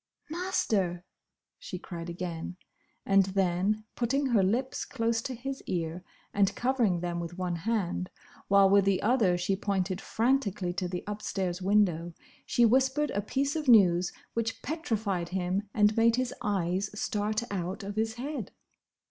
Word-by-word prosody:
"Master!" 205 - 0 0.5
she 185 - -6
cried 170 -1 -7
again; 175 0 -5 0.5
and 195 -1 +5
then, 195 +2 +1
putting 270 +4 0
her 235 -6 +3
lips 240 +8 0
close 230 -3 -1
to 255 +2 -4
his 270 +3 -5
ear 170 0 -2 0.3
and 200 -1 +2
covering 240 -9 +1
them 175 -1 -2
with 170 +1 -6
one 180 -2 -1
hand, 185 -1 -1 0.4
while 200 -1 +6
with 200 +1 +5
the 195 -2 +3
other 210 -6 +3
she 180 +2 0
pointed 190 -1 -1
frantically 220 -7 0
to 185 0 -2
the 180 0 -4
upstairs 190 -3 -3
window, 180 -4 +2 0.3
she 240 - +4
whispered 265 +5 +3
a 205 - -1
piece 275 +7 -1
of 310 -3 -3
news 180 -6 +6 0.2
which 230 -1 -2
petrified 215 - -2
him 190 +2 -1
and 210 0 +3
made 230 0 +4
his 255 -1 -1
eyes 195 -1 0
start 215 +2 -1
out 190 +1 -3
of 200 +1 -5
his 220 0 -1
head. 255 -4 -5
200 Hz, 150 wpm, -29 LUFS, 180-230 Hz, 0.5 s, while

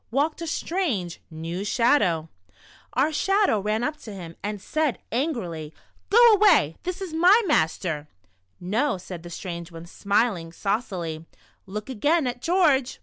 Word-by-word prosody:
walked 295 +6 0
a 335 - -4
stran«.' 310 - -1
e, - - -8 0.2
neii) 165 +3 -5
Sliadoiu! 205 - +2 0.7
Our 285 +5 +2
Shadow 390 - +2
ran 215 +3 -1
up 300 +3 -2
to 225 - -10
him. 175 -4 -8
and 210 0 -4
said 305 +5 -1
ani^rilv: 200 - -3 0.2
" - - -38
Go 470 +2 +7
away, 365 - +4
this 365 +2 -4
is 355 -4 -7
my 360 +7 +6
master." 160 - 0 0.6
•* - - -7
Xo." 225 +2 +1
said 180 -2 -8
the 175 - -10
strange 170 -1 -6
one, 165 0 -9
smiling 200 -2 0
saucily, 175 -5 -3 0.4
*'look 210 +2 -6
again 290 +6 +1
at 245 0 -3
George." 300 -8 +2
220 Hz, 155 wpm, -25 LUFS, -, 0.7 s, Go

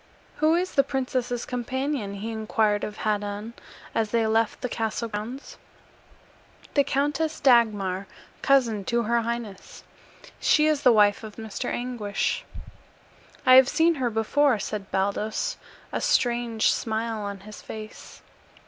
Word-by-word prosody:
"Who 310 +2 +3
is 365 +2 0
the 275 - +4
princess's 255 -3 -2
companion?" 250 -3 -3
he 215 +3 -5
inquired 215 -1 0
of 210 - -5
Haddan, 210 +1 -2 0.4
as 220 -1 0
they 230 0 +1
left 220 0 +1
the - - -1
castle 225 0 -2
grounds. 225 +6 -7 1.1
"The 285 - +4
Countess 295 +4 -1
Dagmar, 205 -7 +3 0.3
cousin 235 -7 +3
to 235 +2 +1
her 235 +2 +1
highness. 230 -4 -6 0.6
She 300 - +4
is 305 -2 +2
the 250 - +6
wife 210 -1 +4
of 215 -1 -9
Mr. 220 +2 -5
Anguish." 240 -5 -2 1.0
"I 255 - +7
have 260 0 +7
seen 335 +1 +3
her 245 - +2
before," 235 +4 +2
said 205 -1 -5
Baldos, 200 +3 -1 0.3
a - - -2
strange 235 -2 +2
smile 225 0 -2
on 200 -1 -5
his 210 +1 -11
face. 215 -1 -10
230 Hz, 135 wpm, -25 LUFS, 210-255 Hz, 1.1 s, I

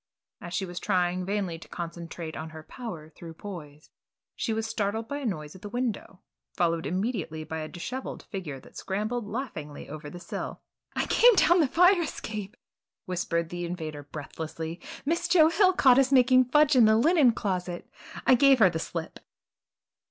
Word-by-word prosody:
As 175 +1 -6
she 195 - 0
sat 175 -1 -9
trying 180 -2 0
vainly 195 -5 -2
to - - -13
concentrate 170 -1 -6
on 160 0 -6
her 155 0 -10
"Power 165 -9 -8
Through 165 +1 -11
Poise," 155 -6 -9 0.4
she 230 - -2
was 220 0 -1
startled 220 0 -2
by 285 +1 -3
a 275 - -2
noise 150 -6 -4
at 185 - -13
the 205 - -7
window, 235 -5 -3 0.3
followed 165 -2 +1
immediately 185 -5 -2
by 160 +1 -5
a 155 - -4
dishevelled 250 +9 -6
figure 165 -9 -6
that - - -17
scrambled 215 +4 -3
laughingly 185 - -6
over 150 0 -8
the 175 - -9
sill. - - -6 0.4
"I - - +1
came 485 -1 +6
down 345 0 +5
the 310 - +4
fire 360 +5 +5
escape!" 215 - -5 0.5
whispered 170 -2 -1
the 175 0 -4
invader 160 -4 -5
breathlessly, 160 +3 -6 0.2
"Miss 335 +4 0
Joe 320 -3 +6
Hill 375 +2 +4
caught 260 -7 +6
us 270 0 +3
making 255 -1 +6
fudge 295 +3 +4
in 245 -3 +7
the 220 0 +5
linen 295 0 +5
closet, 180 -5 -3 0.3
and - - -8
I - - +6
gave 270 +2 +6
her 195 -6 +6
the 160 - -3
slip." 165 0 -5
190 Hz, 180 wpm, -28 LUFS, 165-250 Hz, 0.5 s, in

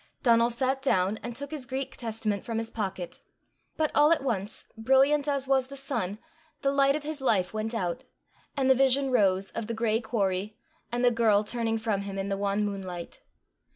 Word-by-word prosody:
Donal 235 -2 +5
sat 260 +3 0
down, 195 -5 +2
and 235 +2 -6
took 285 +3 -5
his 285 -5 -5
Greek 265 +1 -4
Testament 220 -3 -2
from 230 -1 -3
his 225 0 -3
pocket. 190 -5 -4 0.6
But 310 -1 +1
all 295 +2 +5
at 320 -4 +3
once, 215 -6 -3
brilliant 270 +5 +3
as 280 -2 0
was 265 -1 +2
the 275 +1 -9
sun, 235 -8 -3 0.5
the 275 - +3
light 275 0 +3
of 305 - -4
his 300 -1 -5
life 200 -8 +1
went 220 +2 -2
out, 180 -6 -2 0.5
and 270 -1 +2
the 265 - +7
vision 270 +1 +3
rose 195 -5 +2
of 230 -2 -4
the 230 - -3
gray 225 0 +1
quarry, 210 -2 -1 0.3
and 245 +1 +1
the 245 - +5
girl 220 -3 +3
turning 225 +1 0
from 220 -3 -1
him 200 0 -5
in 195 +1 -2
the 195 - -1
wan 200 +1 0
moonlight. 185 -4 -6
230 Hz, 195 wpm, -28 LUFS, 205-270 Hz, 0.6 s, the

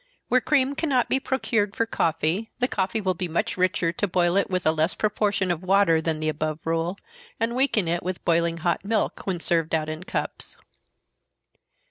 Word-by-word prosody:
Where 255 0 +4
cream 275 -1 +2
cannot 280 -5 +1
be 265 - +2
procured 225 -6 -1
for 230 - +1
coffee, 170 +1 0
the 250 - +1
coffee 195 -1 -1
will 190 -3 0
be 180 +1 -3
much 170 0 -1
richer 185 -2 +1
to 205 +4 -1
boil 175 -1 +2
it 200 - +2
with 185 -1 -1
a 155 - +5
less 160 +2 0
proportion 205 -3 0
of 170 -1 -2
water 185 -3 +3
than 160 -1 -1
the 155 - -2
above 155 0 -1
rule, 165 +3 -1 0.4
and 230 +1 0
weaken 250 -8 +2
it 170 +1 0
with 185 0 -5
boiling 170 0 +2
hot 170 +2 -1
milk, 215 0 -1
when 185 -3 -1
served 165 -1 +1
out 155 -1 -1
in 155 +1 -5
cups. - - -4
185 Hz, 190 wpm, -25 LUFS, 165-215 Hz, 0.4 s, a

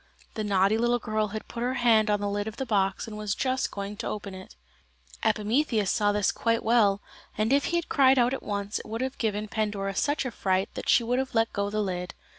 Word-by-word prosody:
The 215 - -3
naughty 200 +1 +2
little 240 +1 +2
girl 215 -2 -1
had 215 +1 -6
put 235 - -6
her 250 +2 0
hand 230 -4 +4
on 205 0 +2
the 205 - -2
lid 205 +1 -2
of 220 - -6
the 265 - -2
box 195 -5 0
and 220 - -8
was 210 -1 -2
just 260 0 0
going 200 +1 -6
to - - -4
open 200 -2 -5
it. 185 0 -11 0.7
Epimetheus 215 -1 +1
saw 205 -2 +2
this 205 -1 +1
quite 230 0 0
well, 210 -4 +3 0.4
and 215 +4 +2
if 280 - +3
he 345 - -1
had 340 -1 0
cried 270 -2 +4
out 245 +1 +3
at 270 - -3
once 200 0 -3
it - - -10
would 225 +2 -4
have 260 +1 -3
given 215 -2 -1
Pandora 205 -2 -2
such 285 +7 0
a 255 - -2
fright 190 -2 0 0.2
she 240 - +5
would 245 +2 0
have 265 -2 -3
let 225 0 +2
go 200 0 -1
the 215 +1 -1
lid. 180 -2 -4
215 Hz, 235 wpm, -27 LUFS, 205-240 Hz, 0.7 s, she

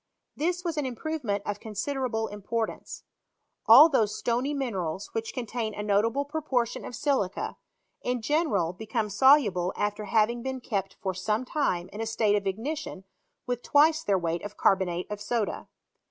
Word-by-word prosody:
This 355 +3 -1
was 335 -3 -2
an 295 - 0
improvement 245 -5 -3
of 205 0 -3
considerable 225 +1 -2
import 220 +2 -2
ance. - - -10 0.6
All 260 +8 +10
those 220 -9 +1
stony 245 +4 0
minerals 195 - -3
which 225 0 -3
contain 230 -2 -4
a 210 - -4
notable 220 +7 +1
proportion 280 -6 -1
of 245 - -7
silica, 250 -9 -1 0.4
in 250 0 -1
general 220 - +1
become 220 +3 -3
solu~ 260 +1 +5
ble 180 0 -1
after 205 0 -1
having 220 +3 +2
been 260 +1 -4
kept 200 -6 -3
for 190 -1 -1
some 210 +6 -1
time 185 - -1
in 210 - -5
a 225 - -2
state 220 -2 +2
of 200 -1 -1
ignition 225 +1 -4 0.4
with 245 -1 -2
twice 310 +4 +4
their 200 -8 +2
weight 170 -1 -2
of 205 0 -8
carbonate 185 -2 +2
of 205 0 -5
soda. 220 0 -2
225 Hz, 165 wpm, -27 LUFS, 205-265 Hz, 0.6 s, All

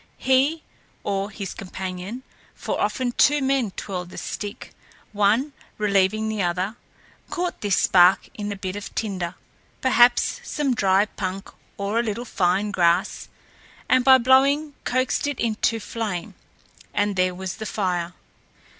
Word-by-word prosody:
He, 275 +5 +2 0.4
or 200 0 -1
his 195 -2 -6
companion, 190 +5 -6 0.3
for - - -3
often 255 -2 0
two 295 +4 +4
men 265 -4 +1
twirled 180 -2 -6
the - - -11
stick, 205 +3 -6 0.4
one 215 +8 +2 0.2
relieving 210 +1 +2
the 215 -1 -2
other, 185 +4 -1 0.5
caught 355 0 -3
this 205 -2 +1
spark 180 +1 +5
in 210 -5 -5
a - - -3
bit 190 -1 -5
of 205 -1 -7
tinder 185 -5 -3 0.4
perhaps 245 -2 +4
some 285 -3 -1
dry 195 -2 +3
punk 195 -1 -5 0.3
or 200 +3 -1
a - - +2
little 230 +2 -3
fine 195 0 +1
grass 175 +1 +1 0.6
and 255 -1 +4
by 265 0 +8
blowing 275 +4 +3
coaxed 255 +3 0
it 290 - -3
into 225 0 0
flame, 215 -6 -4 0.6
and 205 -1 +1
there 185 -1 +1
was 190 0 -5
the 220 - -5
fire. 180 -4 -2
205 Hz, 140 wpm, -23 LUFS, 190-250 Hz, 0.6 s, by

